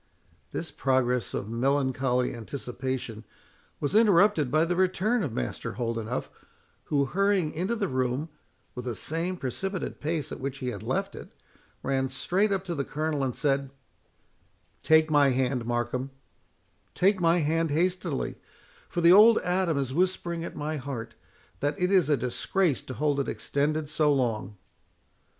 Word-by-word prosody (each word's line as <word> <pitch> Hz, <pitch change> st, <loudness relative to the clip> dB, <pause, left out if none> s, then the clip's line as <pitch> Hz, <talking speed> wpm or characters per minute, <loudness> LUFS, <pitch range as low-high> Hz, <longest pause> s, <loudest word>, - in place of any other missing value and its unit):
This 165 Hz, -, -4 dB
progress 125 Hz, -2 st, +1 dB
of 100 Hz, -, -3 dB
melancholy 130 Hz, +1 st, +1 dB
anticipation 125 Hz, -1 st, -5 dB, 0.6 s
was 145 Hz, -, -2 dB
interrupted 205 Hz, -, +4 dB
by 155 Hz, +3 st, +3 dB
the 175 Hz, +1 st, -1 dB
return 190 Hz, +6 st, +2 dB
of 145 Hz, -, -2 dB
Master 60 Hz, -, -4 dB
Holdenough, 115 Hz, 0 st, -2 dB, 0.6 s
who, 140 Hz, -2 st, +1 dB
hurrying 195 Hz, 0 st, +1 dB
into 185 Hz, +8 st, -1 dB
the 210 Hz, -4 st, -1 dB
room, 130 Hz, +2 st, -1 dB, 0.4 s
with 125 Hz, -1 st, -7 dB
the 120 Hz, -2 st, -3 dB
same 165 Hz, -, -2 dB
precipitate 190 Hz, -, -4 dB
pace 155 Hz, 0 st, -2 dB
at -, -, -6 dB
which 135 Hz, 0 st, -4 dB
he 130 Hz, -2 st, -3 dB
had 100 Hz, -6 st, -6 dB
left -, -, -2 dB
it, -, -, -9 dB, 0.5 s
ran 135 Hz, -1 st, 0 dB
straight 190 Hz, +10 st, 0 dB
up 195 Hz, -1 st, 0 dB
to 175 Hz, -, -3 dB
the 140 Hz, -4 st, -1 dB
Colonel, 150 Hz, 0 st, -2 dB
and 130 Hz, -3 st, -1 dB
said, 140 Hz, -2 st, 0 dB, 1.1 s
"Take 160 Hz, 0 st, +4 dB
my 145 Hz, -2 st, +5 dB
hand, 130 Hz, -2 st, 0 dB
Markham—take 135 Hz, -, -3 dB
my 170 Hz, 0 st, +4 dB
hand 165 Hz, +1 st, +1 dB
hastily; 175 Hz, -1 st, -1 dB, 0.5 s
for 175 Hz, -, -2 dB
the 170 Hz, +1 st, +7 dB
old 220 Hz, +3 st, +8 dB
Adam 180 Hz, -3 st, +1 dB
is 135 Hz, -2 st, -2 dB
whispering 175 Hz, 0 st, 0 dB
at -, -, -6 dB
my 150 Hz, +1 st, -3 dB
heart, 125 Hz, -5 st, -6 dB, 0.5 s
that 145 Hz, +1 st, -1 dB
it 180 Hz, +1 st, +1 dB
is 185 Hz, -5 st, +4 dB
a 145 Hz, -, +4 dB
disgrace 140 Hz, -, 0 dB
to 130 Hz, -, -8 dB
hold 145 Hz, -2 st, +1 dB
it 140 Hz, -, -1 dB
extended 150 Hz, +2 st, -1 dB
so 155 Hz, 0 st, +2 dB
long." 110 Hz, -7 st, -1 dB
145 Hz, 150 wpm, -27 LUFS, 130-175 Hz, 1.1 s, old